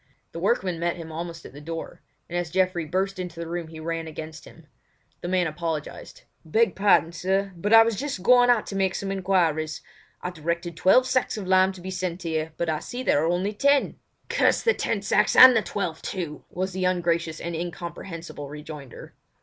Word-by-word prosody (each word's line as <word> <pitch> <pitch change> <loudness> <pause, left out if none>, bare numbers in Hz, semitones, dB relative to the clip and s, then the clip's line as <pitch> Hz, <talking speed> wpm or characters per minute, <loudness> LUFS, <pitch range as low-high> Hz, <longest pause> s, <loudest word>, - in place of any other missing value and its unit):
The 165 - -7
workman 185 -3 0
met 170 0 0
him 165 -2 -8
almost 165 +1 -6
at - - -11
the 145 - -11
door; 165 +2 -7 0.3
and 175 - -7
as 175 -1 -1
Geoffrey 185 -1 +1
burst 190 +4 -1
into 175 -2 -6
the 170 - -4
room 170 0 -4
he 160 0 -10
ran 165 0 -3
against 160 +1 -8
him. 165 - -16 0.6
The - - -4
man 180 0 +1
apologised: 160 -1 -5 0.2
"Beg 205 +6 +2
pardon, 195 -4 +4
sir, 190 +3 -1
but 200 +5 -3
I 225 0 +9
was 225 -2 -1
just 275 -10 -4
going 245 +2 +6
out 240 -3 +3
to 195 - -6
make 190 -1 +1
some 195 -1 -3
enquiries. 175 -5 0 0.4
I 180 - -3
directed 170 +1 -3
twelve 190 +10 +5
sacks 255 -3 0
of 205 - -5
lime 185 0 +4
to 185 - -12
be 190 +1 -6
sent 185 -1 -3
here, 160 -1 -2
but 170 - -1
I 155 -1 0
see 250 +1 -6
there 145 - +2
are - - +1
only 185 +4 -1
ten." 280 +5 +2 0.3
"Damn - - +3
the 465 - +5
ten - - -2
sacks - - +2
and 255 -1 +10
the 225 - +4
twelve 180 -7 -4
too!" 165 -6 -5
was 185 +1 -3
the 185 0 -1
ungracious 170 -3 0
and 170 0 -4
incomprehensible 170 -3 -6
rejoinder. 150 -3 -10
175 Hz, 205 wpm, -25 LUFS, 165-195 Hz, 0.6 s, and